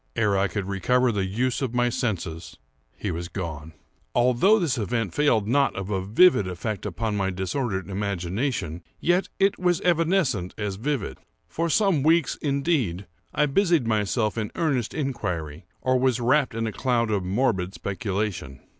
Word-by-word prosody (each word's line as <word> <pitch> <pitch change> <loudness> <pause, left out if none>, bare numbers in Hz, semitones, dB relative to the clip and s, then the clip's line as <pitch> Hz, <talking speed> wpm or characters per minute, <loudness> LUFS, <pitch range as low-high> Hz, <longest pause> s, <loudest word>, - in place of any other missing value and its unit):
Ere 105 -3 +2
I 100 +1 +2
could 100 +1 -3
recover 125 +6 +2
the 100 -3 -1
use 125 +7 -1
of 125 -3 -2
my 120 0 +3
senses 100 -10 -3 0.4
he - - -3
was 85 +1 -4
gone. 80 -4 -6 0.4
Although 125 - +4
this 155 - 0
event 115 -3 -1
failed 115 -9 +2
not 140 +4 +2
of 95 +1 -4
a 95 -2 -1
vivid 110 - +5
effect 100 +3 -4
upon 105 +3 -2
my 95 -1 0
disordered 95 +1 -2
imagination, 100 - -2 0.2
yet 175 +2 +2 0.3
was 180 -2 +2
it - - -10
evanescent 165 - +1
as 105 -2 -3
vivid. 115 - -3 0.3
For 165 +1 -2
some 195 -4 +3
weeks, 160 0 +3
indeed, 140 - 0 0.3
I 150 - +2
busied 170 - +2
myself 110 0 0
in 105 - -2
earnest 135 -10 0
inquiry, 90 - -3 0.2
or 130 0 +2
was 130 -2 +2
wrapped 125 +1 +2
in 115 0 -1
a 110 - -2
cloud 120 -2 0
of 100 -3 0
morbid 95 -2 0
speculation. 100 - -3
115 Hz, 160 wpm, -25 LUFS, 95-135 Hz, 0.4 s, vivid